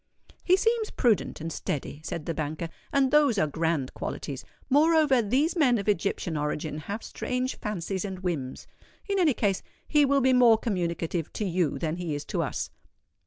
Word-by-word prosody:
"He 370 Hz, +1 st, +4 dB
seems 455 Hz, +1 st, +1 dB
prudent 235 Hz, -6 st, +1 dB
and 165 Hz, 0 st, -4 dB
steady," 145 Hz, 0 st, -4 dB
said 155 Hz, 0 st, -5 dB
the 165 Hz, -, -2 dB
banker; 155 Hz, +2 st, -3 dB, 0.2 s
"and 275 Hz, -2 st, +3 dB
those 290 Hz, -6 st, +4 dB
are 155 Hz, -, +3 dB
grand 160 Hz, -3 st, -1 dB
qualities. 140 Hz, -2 st, -5 dB, 0.2 s
Moreover, 295 Hz, -2 st, +4 dB
these 265 Hz, -, +1 dB
men 265 Hz, -8 st, +4 dB
of 200 Hz, -, -4 dB
Egyptian 195 Hz, -3 st, 0 dB
origin 150 Hz, +1 st, -2 dB
have 200 Hz, +9 st, -5 dB
strange 255 Hz, 0 st, -2 dB
fancies 195 Hz, -3 st, -3 dB
and 190 Hz, -2 st, -4 dB
whims. 155 Hz, -9 st, -3 dB, 0.4 s
In 400 Hz, -1 st, +1 dB
any 310 Hz, -8 st, +4 dB
case, 200 Hz, -4 st, +1 dB, 0.3 s
he 295 Hz, -1 st, +4 dB
will 275 Hz, 0 st, +3 dB
be 260 Hz, 0 st, +4 dB
more 240 Hz, -3 st, +6 dB
communicative 170 Hz, -6 st, -2 dB
to 210 Hz, -, -2 dB
you 180 Hz, -4 st, 0 dB
than 165 Hz, 0 st, -2 dB
he 170 Hz, -4 st, -3 dB
is 145 Hz, -, -5 dB
to -, -, -1 dB
us." -, -, -3 dB
200 Hz, 175 wpm, -27 LUFS, 165-265 Hz, 0.4 s, more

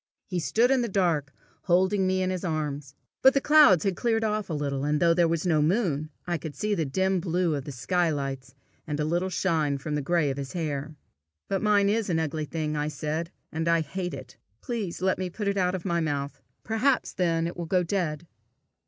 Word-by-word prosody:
He 180 Hz, -2 st, -2 dB
stood 230 Hz, -, +2 dB
in 265 Hz, -2 st, +3 dB
the 235 Hz, -, 0 dB
dark, 170 Hz, -9 st, 0 dB, 0.3 s
holding 190 Hz, +2 st, +3 dB
me 185 Hz, 0 st, +1 dB
in 185 Hz, -, 0 dB
his 185 Hz, 0 st, -3 dB
arms. 150 Hz, -4 st, -3 dB, 0.3 s
But 265 Hz, +1 st, +6 dB
the -, -, +5 dB
clouds 290 Hz, -, +6 dB
had 195 Hz, -2 st, 0 dB
cleared 225 Hz, 0 st, 0 dB
off 215 Hz, -2 st, -1 dB
a -, -, -2 dB
little, 140 Hz, -2 st, -2 dB
and 150 Hz, +1 st, +1 dB
though 170 Hz, -1 st, +4 dB
there 170 Hz, 0 st, +3 dB
was 165 Hz, +1 st, -1 dB
no 160 Hz, -4 st, +3 dB
moon, 155 Hz, -3 st, +1 dB, 0.2 s
I 175 Hz, -2 st, -1 dB
could 155 Hz, -1 st, -7 dB
see 210 Hz, 0 st, -1 dB
the 165 Hz, -6 st, 0 dB
dim 190 Hz, +6 st, +1 dB
blue 175 Hz, -1 st, 0 dB
of 140 Hz, -2 st, -3 dB
the 145 Hz, -, -6 dB
sky 175 Hz, +7 st, 0 dB
lights, 135 Hz, -3 st, -4 dB, 0.3 s
and 150 Hz, -1 st, -3 dB
a 150 Hz, -, +1 dB
little 175 Hz, +4 st, 0 dB
shine 160 Hz, -6 st, 0 dB
from 150 Hz, +2 st, -5 dB
the 150 Hz, -, 0 dB
gray 160 Hz, -1 st, +1 dB
of 135 Hz, -, -5 dB
his 135 Hz, -2 st, -5 dB
hair. 150 Hz, -3 st, -3 dB, 0.5 s
"But 195 Hz, -1 st, -1 dB
mine 205 Hz, -2 st, +3 dB
is 215 Hz, 0 st, +1 dB
an 170 Hz, -, +1 dB
ugly 155 Hz, -1 st, -2 dB
thing," 155 Hz, 0 st, -3 dB
I 150 Hz, 0 st, -1 dB
said, 155 Hz, +3 st, -3 dB, 0.2 s
"and 160 Hz, +1 st, -2 dB
I 170 Hz, -1 st, +3 dB
hate 175 Hz, +2 st, -4 dB
it. 130 Hz, -1 st, -11 dB, 0.2 s
Please 205 Hz, -8 st, -4 dB
let 190 Hz, 0 st, +1 dB
me 185 Hz, -1 st, -2 dB
put 205 Hz, +3 st, -4 dB
it 200 Hz, -, +1 dB
out 185 Hz, -1 st, +1 dB
of 185 Hz, -, -6 dB
my 170 Hz, -2 st, +1 dB
mouth. 145 Hz, -3 st, -3 dB, 0.2 s
Perhaps 235 Hz, +5 st, +1 dB
then 165 Hz, -3 st, +1 dB
it 170 Hz, -, -4 dB
will 170 Hz, -1 st, -5 dB
go 180 Hz, +1 st, +2 dB
dead." 170 Hz, -3 st, -2 dB
170 Hz, 225 wpm, -27 LUFS, 150-190 Hz, 0.5 s, But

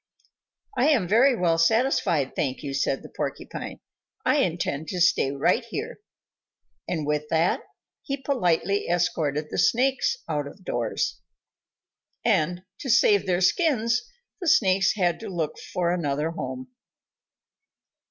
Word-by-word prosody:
"I 255 Hz, +2 st, +3 dB
am 235 Hz, -, +2 dB
very 245 Hz, +7 st, +5 dB
well 170 Hz, -5 st, +1 dB
satisfied, 170 Hz, -, +2 dB
thank 135 Hz, 0 st, -2 dB
you," 140 Hz, -1 st, -4 dB
said 135 Hz, 0 st, -1 dB
the -, -, -10 dB
Porcupine. -, -, -5 dB, 0.4 s
"I -, -, +3 dB
intend 150 Hz, +3 st, -1 dB
to 180 Hz, -, -3 dB
stay 170 Hz, -5 st, +3 dB
right 140 Hz, -, +1 dB
here." 455 Hz, -, -5 dB, 0.9 s
And 160 Hz, -4 st, -2 dB
with 150 Hz, 0 st, -1 dB
that, 165 Hz, +2 st, +2 dB, 0.4 s
he 275 Hz, -, -3 dB
politely 200 Hz, -, 0 dB
escorted 155 Hz, -4 st, 0 dB
the -, -, -2 dB
Snakes 270 Hz, -, +2 dB
out 145 Hz, -1 st, -2 dB
of 190 Hz, +6 st, -13 dB
doors. 120 Hz, -1 st, -2 dB, 1.1 s
And 175 Hz, +3 st, +1 dB, 0.2 s
to 265 Hz, -, -5 dB
save 210 Hz, -4 st, +4 dB
their 180 Hz, 0 st, +1 dB
skins, 245 Hz, -, +2 dB, 0.4 s
the 355 Hz, -, -4 dB
Snakes 195 Hz, -9 st, +4 dB
had 175 Hz, -4 st, +1 dB
to 225 Hz, -, -7 dB
look 165 Hz, -5 st, -3 dB
for 175 Hz, -2 st, 0 dB
another 150 Hz, -2 st, -1 dB
home. 130 Hz, -5 st, -6 dB
180 Hz, 135 wpm, -25 LUFS, 150-230 Hz, 1.1 s, very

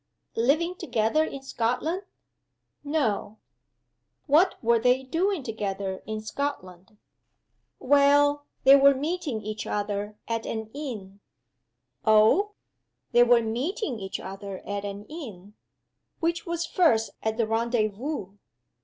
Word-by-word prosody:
"Living 305 Hz, +9 st, +2 dB
together 240 Hz, -1 st, +1 dB
in 275 Hz, -3 st, -6 dB
Scotland?" 270 Hz, +9 st, -1 dB, 0.8 s
"No." 265 Hz, -8 st, -1 dB, 0.9 s
"What 320 Hz, +6 st, +4 dB
were 235 Hz, 0 st, +4 dB
they 250 Hz, +3 st, +3 dB
doing 340 Hz, +5 st, 0 dB
together 200 Hz, -4 st, -4 dB
in 215 Hz, 0 st, -3 dB
Scotland?" 210 Hz, -6 st, -5 dB, 0.8 s
"Well 285 Hz, +1 st, +4 dB, 0.2 s
they 270 Hz, +1 st, +9 dB
were 280 Hz, 0 st, +6 dB
meeting 290 Hz, -5 st, -3 dB
each 215 Hz, 0 st, -5 dB
other 205 Hz, 0 st, -2 dB
at 230 Hz, -1 st, -2 dB
an 220 Hz, -1 st, -4 dB
inn." 215 Hz, -10 st, -7 dB, 0.8 s
"Oh? 220 Hz, -, +4 dB, 0.6 s
They 240 Hz, -, +5 dB
were 240 Hz, -1 st, +5 dB
meeting 255 Hz, -, -2 dB
each 195 Hz, -1 st, -5 dB
other 195 Hz, 0 st, -7 dB
at 200 Hz, 0 st, -4 dB
an 200 Hz, +1 st, -6 dB
inn. 215 Hz, -, -9 dB, 0.7 s
Which 335 Hz, +1 st, -1 dB
was 340 Hz, 0 st, -1 dB
first 235 Hz, -, +2 dB
at 220 Hz, 0 st, -1 dB
the 230 Hz, -, +2 dB
rendezvous?" 225 Hz, 0 st, -1 dB
235 Hz, 115 wpm, -26 LUFS, 210-290 Hz, 0.9 s, they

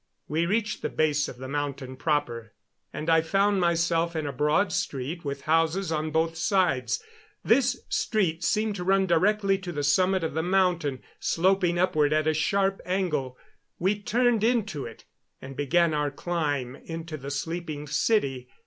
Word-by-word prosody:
We 165 Hz, +3 st, 0 dB
reached 210 Hz, +2 st, -1 dB
the -, -, -2 dB
base 150 Hz, -1 st, +1 dB
of 125 Hz, -, -9 dB
the 130 Hz, +1 st, -7 dB
mountain 140 Hz, -2 st, -4 dB
proper, 125 Hz, -7 st, -2 dB, 0.4 s
and 155 Hz, -, -6 dB
I 165 Hz, -1 st, +5 dB
found 195 Hz, +4 st, +2 dB
myself 170 Hz, 0 st, +1 dB
in 155 Hz, -1 st, -2 dB
a 140 Hz, -, -3 dB
broad 150 Hz, +8 st, +2 dB
street 145 Hz, +6 st, -3 dB
with 140 Hz, -1 st, -4 dB
houses 165 Hz, +3 st, +1 dB
on 155 Hz, 0 st, -1 dB
both 160 Hz, +1 st, 0 dB
sides. 160 Hz, -, +1 dB, 0.4 s
This 250 Hz, +2 st, +3 dB
street 180 Hz, -7 st, 0 dB
seemed 215 Hz, +2 st, +1 dB
to 180 Hz, -, -4 dB
run 195 Hz, +1 st, +3 dB
directly 195 Hz, +3 st, +2 dB
to 185 Hz, -2 st, -6 dB
the 145 Hz, -3 st, -3 dB
summit 185 Hz, +6 st, +2 dB
of 160 Hz, -, -2 dB
the 160 Hz, -, 0 dB
mountain, 175 Hz, -6 st, +1 dB, 0.2 s
sloping 180 Hz, 0 st, +2 dB
upward 155 Hz, -5 st, +2 dB
at 155 Hz, 0 st, +2 dB
a 155 Hz, -, +2 dB
sharp 195 Hz, +5 st, +1 dB
angle. 155 Hz, -9 st, -1 dB, 0.4 s
We 200 Hz, +4 st, 0 dB
turned 235 Hz, +1 st, +2 dB
into 215 Hz, -, 0 dB
it 115 Hz, -, -13 dB, 0.3 s
and 135 Hz, 0 st, -9 dB
began 165 Hz, +4 st, +2 dB
our 150 Hz, -1 st, 0 dB
climb 145 Hz, -5 st, -2 dB
into 165 Hz, -1 st, -7 dB
the 140 Hz, -1 st, -7 dB
sleeping 155 Hz, +1 st, -4 dB
city. 135 Hz, -, 0 dB
165 Hz, 165 wpm, -26 LUFS, 145-190 Hz, 0.4 s, I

